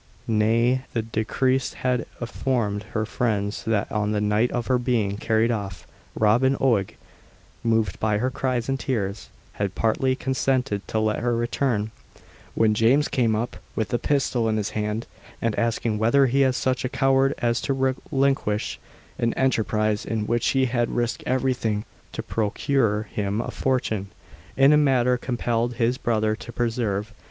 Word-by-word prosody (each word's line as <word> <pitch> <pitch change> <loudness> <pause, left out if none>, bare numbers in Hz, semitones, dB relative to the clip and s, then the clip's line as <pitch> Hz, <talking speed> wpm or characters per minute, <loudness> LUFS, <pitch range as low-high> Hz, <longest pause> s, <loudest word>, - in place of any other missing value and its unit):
Nay, 115 +4 +2
the 115 - 0
deceased 125 +4 0
had 125 -3 -1
informed 120 -4 -1
her 110 -1 0
friends 105 -3 -1
that 110 -2 0
on 105 0 0
the 105 - +1
night 105 +3 +2
of 120 -2 -2
her 130 0 +2
being 115 -5 0
carried 110 +2 +1
off, 100 -5 -4 0.3
Robin 125 +6 +3
Oig, 115 -8 +1 0.7
moved 110 -4 +1
by 105 -1 +1
her 125 +4 0
cries 125 -2 -1
and 135 0 -1
tears, 105 -6 -3 0.2
had 100 -2 -3
partly 130 +4 +1
consented 130 -5 0
to - - -2
let 110 -1 +1
her 120 0 0
return, 115 -2 0 0.6
when 110 -1 +3
James 120 +7 +3
came 115 -4 +1
up 110 -2 -3 0.2
with 110 +3 -2
a 120 - +2
pistol 125 -4 +1
in 110 - +1
his 105 -1 -2
hand, 105 +2 -2 0.3
and, 115 -1 0
asking 115 -2 0
whether 120 +5 +4
he 135 +2 +3
was 130 -1 +2
such 130 0 0
a 125 - -1
coward 135 +1 +2
as 120 0 0
to - - -2 0.4
relinquish 135 -6 0 0.4
an 115 -1 0
enterprise 110 -5 +1
in 110 -2 -2
which 120 +2 0
he 135 -1 +3
had 120 -2 0
risked 120 0 -1
everything 125 -5 0 0.3
to - - -4
procure 110 0 0
him 105 -1 -3
a - - -3
fortune, 110 -7 -1 0.5
in 135 +2 +6
a - - +6
manner 130 -4 +3
compelled 120 -1 -1
his 120 +2 +1
brother 110 -2 +1
to 120 - -10
persevere. 115 -4 -1
115 Hz, 160 wpm, -24 LUFS, 110-130 Hz, 0.7 s, in